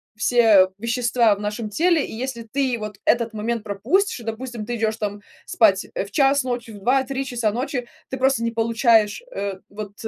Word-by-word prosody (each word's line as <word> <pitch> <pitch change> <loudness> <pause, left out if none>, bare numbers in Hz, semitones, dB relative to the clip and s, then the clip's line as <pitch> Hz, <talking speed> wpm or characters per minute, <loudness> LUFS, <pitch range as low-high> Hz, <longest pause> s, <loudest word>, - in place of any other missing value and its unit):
все 220 -4 +5
вещества 235 0 +2
в - - -12
нашем 210 +1 -3
теле, 330 - +2
и - - -9
если 235 0 -4
ты 255 +1 -1
вот 210 -2 -6
этот 230 -1 +1
момент 225 +1 -2
пропустишь, 235 - 0
и, - - -10
допустим, 230 0 -5
ты 240 +2 -3
идешь 220 -1 -1
там 205 -1 -4 0.2
спать - - +3
в - - -3
час 280 -2 +3
ночи, 245 -2 -4
в 205 - -10
2-3 265 +4 0
часа 240 -4 -1
ночи, 245 +1 -3 0.2
ты 265 - -4
просто 265 -2 +2
не 230 - 0
получаешь, 225 - +2
э, 200 -1 -3
вот, 205 0 -8
230 Hz, 185 wpm, -22 LUFS, 215-255 Hz, 0.2 s, все